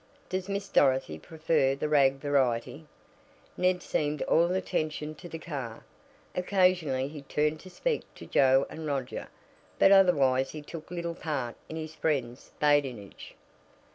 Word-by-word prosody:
Does 185 +1 -3
Miss 200 0 -2
Dorothy 130 - +2
prefer 155 - +1
the 140 - -2
rag 140 -3 +4
variety?" 135 +1 0 0.7
Ned 180 0 +1
seemed 150 0 -1
all 170 +2 +3
attention 155 -4 -2
to 175 +3 -11
the 165 - -6
car. 135 -9 -6 0.5
Occasionally 180 -8 +2
he 145 0 -8
turned 150 +2 0
to 185 - -12
speak 470 - -1
to - - -10
Joe 135 0 +4
and 160 -1 -7
Roger, 135 -3 -3 0.5
but 195 - +6
otherwise 140 -9 +5
he 155 -1 -8
took 160 +1 -9
little 170 -1 -3
part 140 -8 -3
in 160 - -6
his 160 -1 -6
friends' 135 -6 -2
badinage. 135 -9 0
150 Hz, 140 wpm, -29 LUFS, 135-170 Hz, 0.7 s, but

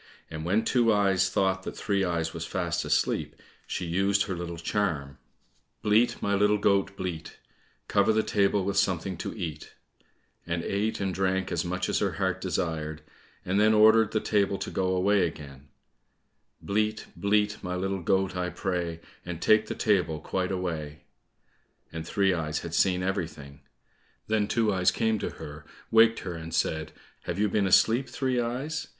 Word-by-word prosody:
And 80 -1 -5
when 100 +7 +1
Two 120 -3 +3
eyes 95 -2 +3
thought 95 0 +1
that - - -7
Three 100 -2 0
eyes 85 -3 -1
was - - -5
fast - - -2
asleep, - - 0 0.3
she 90 - -3
used 95 +4 +2
her 95 - -4
little 85 0 -5
charm, 80 -7 -2 0.6
"Bleat, 110 +3 +3
my 100 - +1
little 105 +1 +3
goat, 100 0 +1
bleat, 85 -4 -5 0.5
Cover 100 +1 +3
the 110 0 +2
table 100 -1 +1
with 100 0 -1
something 95 -2 0
to - - -5
eat," 80 -6 -6 0.7
and 85 0 -2
ate 105 +3 -1
and 95 -2 -1
drank 95 0 0
as 85 - 0
much 90 +1 -2
as - - 0
her - - 0
heart - - -1
desired, 80 -2 -3 0.4
and 95 +2 +1
then 110 +1 +5
ordered 110 0 +6
the 110 - 0
table 100 -2 +1
to - - -5
go 95 0 0
away 95 0 +3
again, 70 -3 -10 1.0
"Bleat, 110 +1 -1
bleat, 105 +1 +1
my 90 -1 -3
little 95 +1 -2
goat, 95 +2 +1
I 90 0 -1
pray, 85 -4 -3 0.2
And 85 -2 -6
take 110 +3 +4
the - - -4
table 90 -8 +1
quite 95 +4 -2
away," 80 -6 -4 0.9
and 80 0 -6
Three 95 -2 +2
eyes 75 -3 -2
had 85 -1 -7
seen 90 +1 +2
everything. 75 -7 -4 0.6
Then 110 -1 +1
Two 110 -2 +1
eyes 90 -1 +3
came 110 -2 0
to - - -2
her, 75 -1 -9 0.3
waked 115 0 +5
her 90 - -5
and 80 0 -6
said, 80 -2 -1 0.3
"Have 90 - -3
you 105 +1 +2
been 100 -1 +1
asleep, 115 +7 +4
Three 130 -2 -1
eyes? 135 +7 -3
95 Hz, 170 wpm, -27 LUFS, 85-105 Hz, 1.0 s, ordered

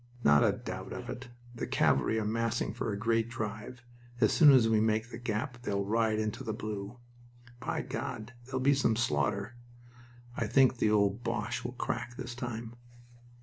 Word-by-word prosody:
"Not 75 0 +6
a - - +4
doubt - - -6
of - - -6
it. 130 +1 -7 0.3
The 120 - -4
cavalry 110 - +2
are 110 - -2
massing 115 +2 -1
for 110 - -3
a 100 - -2
great 115 +1 +1
drive. 110 +2 -5 0.4
As - - +4
soon 150 -3 +8
as 125 -4 +6
we 110 -1 +3
make 110 +2 +1
the 115 - -7
gap 120 +2 -3
they'll 100 -4 -1
ride 110 +1 +1
into 110 +4 -2
the 110 -4 -3
blue." 105 +1 -5 0.6
"By - - -2
God!... 110 +3 -5
There'll 130 0 -3
be 140 +2 +5
some 130 -5 +2
slaughter" 100 - 0 0.8
"I - - -1
think 130 -2 +4
the 110 - +2
old 105 +2 +2
Boche 115 +1 -2
will 120 - -4
crack 120 -1 -3
this 125 -2 -5
time." 120 -2 -5
115 Hz, 180 wpm, -31 LUFS, 110-120 Hz, 0.8 s, soon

